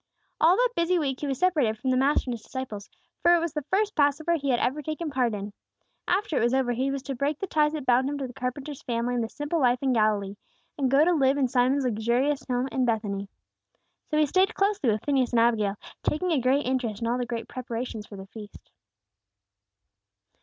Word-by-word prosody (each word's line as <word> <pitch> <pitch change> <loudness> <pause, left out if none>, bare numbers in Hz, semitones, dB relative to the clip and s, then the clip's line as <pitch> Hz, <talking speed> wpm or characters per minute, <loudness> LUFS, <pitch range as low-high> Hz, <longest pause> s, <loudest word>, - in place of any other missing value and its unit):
All 335 +3 +5
that - - +3
busy 340 +2 +2
week 275 -5 -1
he 295 - -3
was 270 -2 -2
separated 295 -12 +2
from 260 +4 -1
the - - +2
Master 270 +2 +2
and - - -1
His 230 - -7
disciples; 220 -5 -7 0.3
for 345 0 +6
it - - +3
was 335 -2 -3
the 300 - -2
first 405 +8 0
Passover 300 +3 +2
he 285 -4 -1
had 245 -2 +2
ever 275 +5 0
taken 310 +1 -4
part 250 -5 +1
in. 200 0 -6 0.5
After 370 -3 0
it - - +2
was 240 +2 +2
over, 260 -2 +1
he 255 +3 0
was 275 -1 -3
to 275 - -4
break 280 +3 -1
the 390 - -3
ties 305 -4 +1
that 300 -4 -4
bound 255 +2 +3
him 290 - -3
to 275 - -3
the 250 - -8
carpenter's 270 +2 -5
family 235 0 -2
and 240 -1 0
the 225 - -4
simple 295 +6 -2
life 250 -3 +3
in 265 -1 +2
Galilee, 210 -3 +1 0.4
and 270 -3 0
go 280 +4 +5
to 355 - +3
live 275 -3 +3
in 270 -2 +2
Simon's 260 +2 +2
luxurious 245 +5 0
home 250 +1 0
in 260 - 0
Bethany. 205 -4 -1 0.8
So 305 - 0
he 305 - +5
stayed 370 +6 +2
closely 395 - +1
with 215 -1 0
Phineas 265 -4 +1
and 235 - +4
Abigail, 220 -4 +2 0.3
taking 355 +4 -1
a 295 -5 +2
great 265 +4 +2
interest 245 -5 -1
in - - 0
all 245 +2 0
the 245 - -2
great 230 -2 -4
preparations 235 -3 -5
for 205 - -10
the 195 -1 -9
feast. 205 0 -12
260 Hz, 230 wpm, -26 LUFS, 235-300 Hz, 0.8 s, for